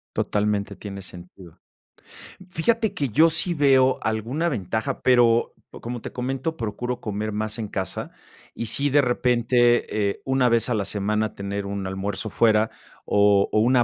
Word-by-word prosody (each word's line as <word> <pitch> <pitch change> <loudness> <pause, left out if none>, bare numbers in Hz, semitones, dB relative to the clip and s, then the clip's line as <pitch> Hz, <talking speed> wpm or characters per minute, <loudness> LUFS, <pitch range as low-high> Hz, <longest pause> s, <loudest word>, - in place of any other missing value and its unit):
Totalmente, 105 -1 -1
tiene 100 -2 -8
sentido. 90 -2 -13 0.9
Fíjate 220 +4 0
que 140 -8 -2
yo 160 +9 +5
sí 165 +3 0
veo 135 -4 +4
alguna 115 +10 -1
ventaja, 110 - -3
pero, 120 -2 +3 0.2
como 120 0 -7
te - - -7
comento, 135 +5 -3
procuro 120 +3 -3
comer 105 0 -3
más 110 +1 -3
en 110 - -3
casa, 95 -2 -4 0.4
y 115 - -4
sí 140 +6 +1
de 145 +1 +4
repente, 120 -4 +2
eh, - - -6
una 130 -2 +2
vez 115 -1 +2
a - - +1
la 105 -3 -1
semana 105 +2 -1
tener 100 0 -4
un 100 -1 -4
almuerzo 95 +3 -4
fuera, 110 -1 +3 0.3
o 100 -1 +4
o 110 - +2
una 120 +2 +4
115 Hz, 155 wpm, -24 LUFS, 105-130 Hz, 0.9 s, yo